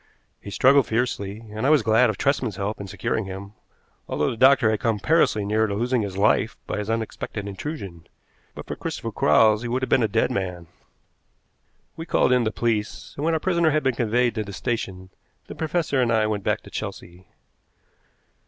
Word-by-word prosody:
He - - -9
struggled 135 +5 +4
fiercely, 110 -3 -2
and 110 +2 -5
I 135 - +3
was 150 -6 +4
glad 110 +3 +4
of 105 - -3
Tresman's 130 -6 0
help 100 +2 -3
in 100 - -6
securing 110 +2 -2
him, 95 +1 -8 0.6
although 75 - 0
the - - -5
doctor 130 -2 +5
had 110 - -1
come 115 -2 0
perilously 110 -5 +2
near 110 +2 +1
to 100 - -3
losing 120 +3 0
his 100 -2 -5
life 105 +2 +2
by - - -3
his 105 +1 -4
unexpected 110 -2 -4
intrusion. 100 - -7 0.5
But - - -8
for - - -5
Christopher - - -5
Quarles 110 +7 +4
he 120 - -4
would 125 +2 -1
have - - -2
been 130 - +4
a 110 - +3
dead 110 +2 +1
man. 90 -3 -3 1.3
We 165 +1 -7
called - - +2
in 125 -2 +3
the 110 - 0
police, 110 -2 -2
and, 145 - -5
when 165 +1 +2
our - - 0
prisoner 170 -1 +2
had 155 0 +1
been 130 -1 +2
conveyed 120 +1 +1
to 110 - -2
the 100 -1 -9
station, 95 -4 -4 0.3
the - - -9
professor 160 -4 -1
and 120 -2 +1
I 110 -1 +3
went 105 -2 -2
back - - 0
to - - -14
Chelsea. 90 +2 -7
110 Hz, 200 wpm, -24 LUFS, 100-125 Hz, 1.3 s, doctor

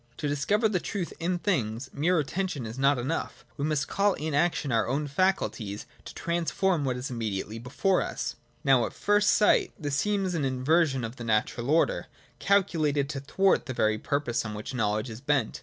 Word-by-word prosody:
To 150 - -2
discover 200 +11 +2
the 200 -4 0
truth 185 -1 -4
in 175 +2 0
things, 130 - -1
mere 170 +5 +2
attention 160 -2 -2
is 115 +4 -7
not 140 0 +4
enough; 130 +7 -3
we 140 - -2
must 155 -1 0
call 200 0 +2
in 155 +1 -3
the 140 - +1
action 160 -4 0
of 115 - +3
our 110 - +1
own 140 +5 0
faculties 140 - -1 0.2
to - - -9
transform 170 0 0
what 130 -2 -1
is 125 +1 -5
immediately 110 -2 -3
before 145 - +1
us. - - -3 0.3
Now, 130 -3 +4
at - - -10
first 205 0 +2
sight, 210 - +4
this 145 -2 -2
seems 195 -2 0
an 160 -4 -1
inversion 135 +1 +2
of 115 +3 -5
the 120 - -6
natural 115 +2 0
order, 160 +2 +2 0.3
calculated 155 -8 +2
to 145 - -3
thwart 190 +6 +2
the 130 - -4
very 110 -1 +2
purpose 140 -3 -1
on 110 -1 -5
which 105 +5 -6
knowledge 110 0 -1
is 110 +2 -9
bent. 140 -5 0
145 Hz, 195 wpm, -28 LUFS, 120-175 Hz, 0.3 s, not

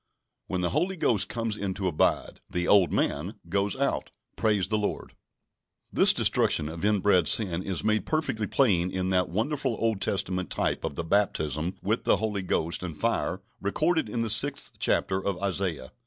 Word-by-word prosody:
When 95 -1 -2
the 90 - 0
Holy 175 +6 0
Ghost 115 - +1
comes 115 -2 -2
in 100 -3 -3
to 95 - -2
abide, 80 -4 0
"the 90 0 -2
old 100 -3 +5
man" 85 +9 -1
goes 100 +1 0
out. - - -1 0.3
Praise 105 -4 +1
the 110 +2 0
Lord! 105 - -3 0.8
This - - +6
destruction 75 - +1
of 80 +2 -7
inbred 100 -4 +3
sin 90 -6 +2
is 95 -3 -2
made 110 0 +1
perfectly 150 -9 -1
plain 95 -10 +2
in 95 0 -2
that 90 -1 +2
wonderful 130 - -1
Old 110 -4 0
Testament 95 -2 -1
type - - -1
of - - -3
the 85 - -3
baptism 80 -3 0
with 110 +4 0
the - - +3
Holy 105 -3 -2
Ghost 85 -2 0
and 85 -4 -6
fire 110 -4 -1 0.2
recorded 155 - 0
in 115 +2 -2
the 115 -2 0
sixth 140 +7 +1
chapter 95 0 +1
of 100 -2 -1
Isaiah. 90 -8 -2
100 Hz, 175 wpm, -27 LUFS, 90-110 Hz, 0.8 s, This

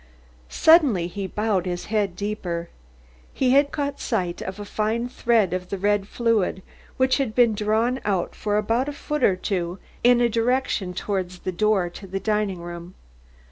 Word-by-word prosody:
Suddenly 285 - +5
he 190 +2 -4
bowed 205 -2 -1
his 175 -1 -3
head 205 -4 -1
deeper. 180 -4 -4 0.6
He 255 -2 +1
had 280 +2 +4
caught 285 -1 -3
sight 180 -8 -2
of 190 +2 -6
a 205 - -6
fine 220 +3 -1
thread 230 -6 +1
of 185 0 -4
the 200 - -3
red 205 +1 +1
fluid 215 -5 0 0.3
which 260 0 +3
had 255 -6 -2
been 240 -3 +5
drawn 220 +5 +1
out 190 -4 -1
for 210 -1 -1
about 230 +6 0
a - - -5
foot 300 +1 -3
or 190 - +5
two 180 -1 -2 0.3
in 245 0 +6
the 240 0 +3
direction 230 -5 0
towards 185 -2 -3
the 185 - -3
door 195 0 +2
to 195 +3 -10
the 195 +1 -3
dining 210 -3 -1
room. 175 +1 -8
210 Hz, 175 wpm, -24 LUFS, 185-235 Hz, 0.6 s, in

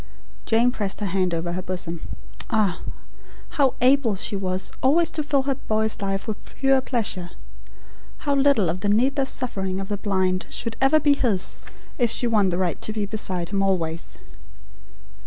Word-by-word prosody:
Jane 235 +2 +4
pressed 205 -5 -2
her - - 0
hand 185 -1 0
over 170 +1 -2
her 180 +2 -2
bosom. 180 -3 -3 0.5
Ah, 210 -6 +1 0.7
how 275 -5 +2
able 255 -4 +4
she 200 +1 -2
was 185 -1 -1
always 325 +5 +3
to 315 - -2
fill 285 -2 +1
her 275 0 0
boy's 220 -3 -1
life 195 0 -2
with 215 -2 -4
pure 270 -1 +1
pleasure. 215 -9 -1 1.0
How 285 - +2
little 275 -8 +3
of 175 +3 -2
the 205 - 0
needless 265 +6 +2
suffering 190 -6 -2
of 195 - -5
the 205 - -1
blind 190 -2 0
should 230 -1 -4
ever 270 +4 +5
be 290 -1 +4
his 225 -9 +1 0.4
if 240 -2 +3
she 245 - 0
won 215 -5 +3
the 175 - -1
right 180 -2 -1
to - - 0
be 215 -1 -2
beside 185 -5 -2
him 200 -1 0
always. 170 -4 -1
210 Hz, 175 wpm, -24 LUFS, 185-260 Hz, 1.0 s, ever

